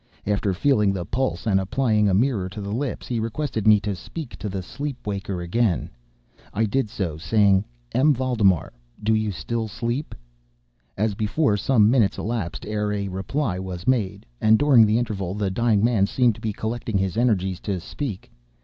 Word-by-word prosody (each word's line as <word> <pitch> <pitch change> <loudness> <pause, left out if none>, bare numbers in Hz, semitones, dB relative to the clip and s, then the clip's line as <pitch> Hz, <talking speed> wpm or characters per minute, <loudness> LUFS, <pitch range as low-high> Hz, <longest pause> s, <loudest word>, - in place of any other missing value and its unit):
After 100 -1 0
feeling 105 -4 +3
the 90 -3 -3
pulse 115 -5 -2
and 100 -4 +3
applying 105 +1 +1
a - - +2
mirror 105 -4 +1
to 100 - -8
the 100 0 -5
lips, 130 +5 -3
he 120 -2 -2
requested 115 -1 -2
me 105 -1 +7
to 105 -1 -2
speak 140 - -8
to 105 - -4
the 95 -1 -4
sleep 140 +5 -6
waker 100 -3 -3
again. 95 +1 0 0.6
I 110 +2 +2
did 110 +1 0
so, 85 -7 -3
saying: 95 +4 +3 0.3
"M. 140 +5 +4
Valdemar, 115 - +1 0.3
do 110 +1 +3
you 110 -1 +1
still 110 +7 -3
sleep?" 120 +7 -3 0.8
As 105 +1 +1
before, 110 +4 +1
some 110 +1 +3
minutes 115 -6 +3
elapsed 110 -6 -3
ere 105 0 -1
a 100 -1 -2
reply 95 +3 -2
was 90 -2 -6
made; 105 - 0 0.2
and 110 0 +5
during 130 -6 +6
the 105 +2 +2
interval 100 -6 -2
the 100 -2 -1
dying 110 0 +2
man 110 -5 +3
seemed 120 +1 +2
to 110 - -14
be 110 -2 -1
collecting 110 0 -3
his 95 -2 -1
energies 95 -6 +1
to 100 -3 -3
speak. 105 - -6
105 Hz, 180 wpm, -24 LUFS, 95-120 Hz, 0.8 s, me